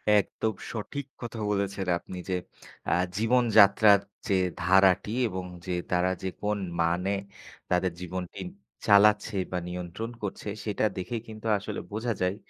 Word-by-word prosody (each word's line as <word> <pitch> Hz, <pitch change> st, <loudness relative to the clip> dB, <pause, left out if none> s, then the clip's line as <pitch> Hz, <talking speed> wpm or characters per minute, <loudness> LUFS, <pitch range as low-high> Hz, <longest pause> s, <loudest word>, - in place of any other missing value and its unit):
একদম 110 Hz, +2 st, +1 dB, 0.2 s
সঠিক 125 Hz, +5 st, -5 dB, 0.2 s
কথা 120 Hz, -1 st, -6 dB
বলেছেন 100 Hz, -1 st, -1 dB
আপনি 90 Hz, -, -9 dB
যে, 95 Hz, -, +1 dB, 0.5 s
"আ -, -, +1 dB, 0.3 s
জীবন 120 Hz, +3 st, +3 dB, 0.2 s
যাত্রার 100 Hz, +1 st, +7 dB, 0.3 s
যে 100 Hz, -, +2 dB, 0.2 s
ধারাটি 95 Hz, +3 st, +4 dB, 0.2 s
এবং 95 Hz, -3 st, -4 dB, 0.2 s
যে 95 Hz, -, -3 dB, 0.2 s
তারা 90 Hz, +1 st, +2 dB
যে 95 Hz, -, 0 dB
কোন 105 Hz, 0 st, 0 dB, 0.2 s
মানে 90 Hz, +3 st, +1 dB, 0.6 s
তাদের 90 Hz, 0 st, +2 dB
জীবনটি 90 Hz, 0 st, -5 dB, 0.5 s
চালাচ্ছে 105 Hz, +1 st, +5 dB, 0.2 s
বা, 90 Hz, -, -1 dB
নিয়ন্ত্রণ 90 Hz, +6 st, -5 dB
করছে, 100 Hz, +1 st, -4 dB, 0.2 s
সেটা 105 Hz, 0 st, 0 dB
দেখে 95 Hz, +5 st, -3 dB
কিন্তু 110 Hz, 0 st, -7 dB
আসলে 100 Hz, -, -5 dB
বোঝা 115 Hz, +3 st, -1 dB
যায় 90 Hz, +1 st, +1 dB
100 Hz, 140 wpm, -28 LUFS, 90-105 Hz, 0.6 s, যাত্রার